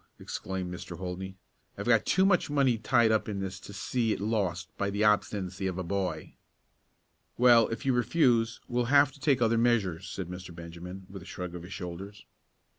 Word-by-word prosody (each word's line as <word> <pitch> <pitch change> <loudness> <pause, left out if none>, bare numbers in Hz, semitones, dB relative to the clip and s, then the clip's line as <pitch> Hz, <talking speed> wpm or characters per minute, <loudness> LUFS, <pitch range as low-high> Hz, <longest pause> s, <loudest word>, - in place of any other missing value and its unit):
exclaimed 95 -2 -4
Mr. 90 -1 -7
Holdney. 95 +1 -5 0.4
"I've - - -5
got - - +3
too 190 - +4
much 180 -5 +3
money 135 -5 +2
tied 115 0 +3
up 110 0 +1
in 100 -2 -3
this 95 -1 -4
to - - -11
see 115 +3 -1
it - - -1
lost 95 -5 -2
by 100 - -1
the 100 +1 -1
obstinacy 100 -3 +1
of 95 -1 -3
a 95 - -2
boy." 90 -4 -3 1.0
"Well, 120 -2 +6
if 115 +2 -5
you 135 - +3
refuse, 120 -2 +2
we 120 - -3
will 120 - +2
have 140 +2 +5
to 140 - -17
take 135 -3 +2
other 115 0 +3
measures," 100 -8 +1
said 95 -2 -5
Mr. 90 -1 -8
Benjamin, 85 +3 -9
with 95 0 -9
a - - -12
shrug 90 -1 -6
of 90 - -6
his 90 +3 -9
shoulders. 95 +3 -7
100 Hz, 195 wpm, -29 LUFS, 90-120 Hz, 1.0 s, Well